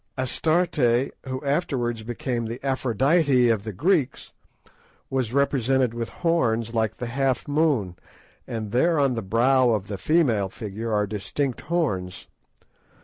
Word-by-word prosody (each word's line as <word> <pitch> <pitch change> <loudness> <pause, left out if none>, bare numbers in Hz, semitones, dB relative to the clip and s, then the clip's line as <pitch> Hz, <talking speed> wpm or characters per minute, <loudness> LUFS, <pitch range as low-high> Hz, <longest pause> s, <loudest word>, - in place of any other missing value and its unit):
Astarte, 160 +7 0 0.5
who 130 +2 -5
afterwards 130 -6 -1
became 120 +1 -3
the 115 +2 -5
Aphrodite 135 +1 +2
of 110 -3 +1
the 110 - -5
Greeks, 150 - 0 0.8
was 130 -4 -1
represented 130 -2 +1
with 115 -1 -4
horns 115 -10 0
like 110 -1 0
the 125 - -4
half 130 +1 -1
moon, 145 - +1 0.5
and 110 -3 -5
there 160 +7 +2
on 140 -2 +2
the 115 - -3
brow 125 +5 +3
of 105 -4 -1
the 100 -2 -5
female 120 - +2
figure 110 +3 -6
are 105 -1 +2
distinct 110 +6 -3
horns. 130 - -2
125 Hz, 135 wpm, -24 LUFS, 110-140 Hz, 0.8 s, brow